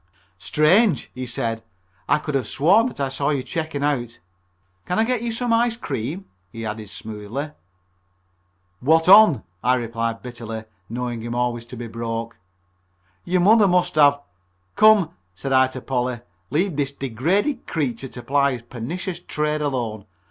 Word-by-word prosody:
"Strange!" 180 - +3
he 130 0 -5
said, 115 -2 -2 0.5
"I - - +5
could 150 0 -5
have 130 -5 0
sworn 195 - +4
that 255 - -8
I 135 -1 0
saw 140 +2 -1
you 140 -4 0
checking 155 -2 -3
out. 120 -8 -1 0.7
Can 180 - -1
I 220 - +4
get 245 0 0
you 235 0 -2
some 235 +1 0
ice 230 0 +2
cream?" 165 - -4 0.3
he 115 0 -6
added 105 -1 -5
smoothly. 110 +8 -6 1.3
"What 160 +5 +3
on?" 200 -6 +8 0.2
I 125 +2 +4
replied 115 -1 -3
bitterly, 115 -3 -6 0.3
knowing 120 0 -3
him 120 +1 -4
always 120 -1 -1
to 125 - -10
be 120 - -5
broke. 115 0 -4 0.9
"Your 180 0 +1
mother 210 +2 +6
must 180 -1 +2
have 145 -2 +5 0.3
" 90 0 -44
"Come," 215 -6 +6 0.2
said 135 +8 -3
I 130 0 +5
to 130 0 -8
Polly, 125 -2 -2 0.3
"leave 170 +1 0
this 140 -2 0
degraded 165 - -1
creature 135 -5 -2
to 125 -1 -10
ply 140 +2 +2
his 120 -2 -7
pernicious 165 - -5
trade 150 -2 -2
alone. 115 -8 -3
135 Hz, 160 wpm, -22 LUFS, 120-175 Hz, 1.3 s, on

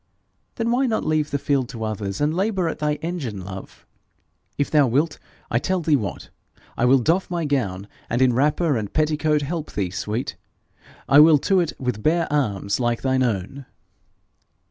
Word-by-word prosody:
'Then 230 0 -1
why 260 +2 +2
not 225 - -1
leave 155 -1 +1
the 140 - -1
field 140 -3 0
to 115 -2 -6
others, 105 -3 -3
and 150 +1 +1
labour 190 -1 0
at 160 - -4
thy 150 -1 0
engines, 135 - -4
love? 95 0 -10 0.7
If 145 - -1
thou 150 -3 +5
wilt, 145 +6 0 0.3
I 120 - +2
tell 185 +8 -1
thee 155 -2 +3
what 105 -9 -4 0.4
I 120 - +1
will 130 +2 +6
doff 165 +9 +1
my 170 -2 -2
gown, 100 -10 -1 0.2
and 120 - 0
in 130 -2 +4
wrapper 150 +3 +2
and 105 -2 -4
petticoat 150 -1 +1
help 155 +1 -4
thee, 95 -4 -2
sweet. 105 +6 -3 0.7
I 140 - +7
will 155 0 +8
to 195 -2 +4
it 170 -3 0
with 125 -5 -3
bare 170 +7 +2
arms 100 -8 0
like 120 -1 -1
thine 130 -1 +1
own.' 125 +3 -2
140 Hz, 180 wpm, -23 LUFS, 115-160 Hz, 0.7 s, will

